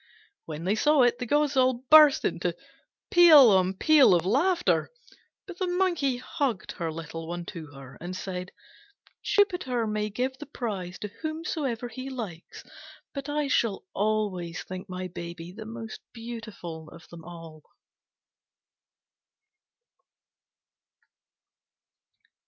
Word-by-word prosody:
When 155 0 -6
they 190 +3 +1
saw 295 +5 +4
it, 245 0 +2
the 250 - -4
gods 295 +1 +2
all 255 -1 +2
burst 305 -2 +8
into - - -1 0.6
peal 315 -9 +8
on 190 0 +3
peal 285 - +6
of 170 0 0
laughter; 345 - +2 0.6
but 370 -2 -10
the 370 - 0
Monkey 355 -8 +1
hugged 250 -4 -3
her 165 -3 -4
little 165 0 -7
one 175 0 -5
to 160 -3 -8
her, 135 -2 -13
and 180 +2 -5
said, 185 -1 -5 0.7
"Jupiter 355 - +1
may 210 0 -2
give 255 +5 -3
the 295 - -8
prize 200 -10 -5
to 210 - -4
whomsoever 310 -7 -3
he 255 +3 -7
likes: 215 -11 -7 0.5
but 275 0 -6
I 295 0 0
shall 230 -7 0
always 200 -5 -1
think 185 +2 -8
my 185 0 -4
baby 170 -1 -8
the 215 +3 -9
most 225 -1 -8
beautiful 215 -9 -8
of 170 - -14
them 170 -1 -11
all." 165 -2 -11
220 Hz, 125 wpm, -27 LUFS, 175-275 Hz, 0.7 s, burst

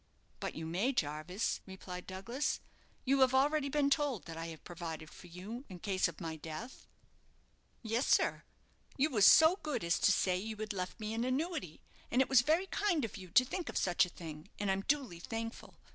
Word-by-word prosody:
"But - - -4
you 160 - -5
may, 190 +12 0
Jarvis," 155 - -1
replied 185 -1 -8
Douglas. 230 +9 -2 0.5
"You 270 +1 +3
have 260 0 +5
already 285 +1 +3
been 280 0 +2
told 280 - +1
that 165 - -7
I 165 0 -5
have 160 -2 -9
provided 165 -3 -7
for 180 - -13
you 195 +9 -7
in 185 - -8
case 190 0 +1
of 170 -2 -9
my 160 -1 -4
death." 160 - -8 1.0
"Yes, 230 +3 0
sir, - - +3 0.6
you 290 +3 +2
was 210 -5 +6
so 320 +4 +8
good 300 - -2
as 170 0 +1
to - - +5
say 185 -2 +2
you 220 +4 -4
had 215 -1 -4
left 185 -1 -4
me 215 0 -3
an 230 +1 -1
annuity, 255 - -2 0.3
and 245 - +1
it 265 - +3
was 265 -2 +7
very 320 +8 +2
kind 370 - +1
of 220 - -7
you 185 -2 -9
to 255 +9 +5
think 345 +4 -4
of - - -3
such 180 -2 +3
a 180 - -1
thing, 160 0 -9
and 200 -1 +1
I'm 190 0 0
duly 260 -8 -1
thankful. 225 +5 -6
215 Hz, 205 wpm, -34 LUFS, 175-265 Hz, 1.0 s, so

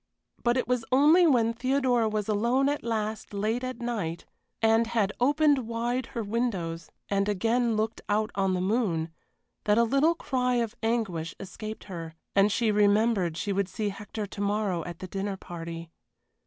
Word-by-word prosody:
But 240 +1 +2
it 255 - 0
was 250 -1 +1
only 305 +7 +6
when 230 -6 +3
Theodora 250 -2 +1
was 210 -1 -2
alone 235 +6 +2
at 290 - -2
last 220 -2 -3
late 220 +5 -1
at 255 -1 -4
night, 205 -9 -3 0.3
and 225 +1 +3
had 220 -3 0
opened 285 -1 +3
wide 235 +2 -1
her 230 - 0
windows 195 -8 -2 0.2
and 200 0 +1
again 230 +3 +1
looked 220 +1 -1
out 215 +2 +1
on 195 -1 +1
the 180 - -1
moon, 185 -6 0 0.5
that 210 0 +3
a 235 - +5
little 275 +8 +3
cry 250 -4 0
of 230 -2 0
anguish 215 -8 -1
escaped 215 +3 -7
her, 165 -4 -7 0.2
and 200 +1 +5
she 225 0 +2
remembered 205 -4 +3
she 200 +2 -1
would 195 -1 0
see 210 +1 -2
Hector 205 +2 -6
to 200 0 -7
morrow 200 -4 0
at 175 -1 -6
the 185 - -7
dinner 195 +1 -3
party. 170 -2 -7
215 Hz, 170 wpm, -28 LUFS, 195-240 Hz, 0.5 s, only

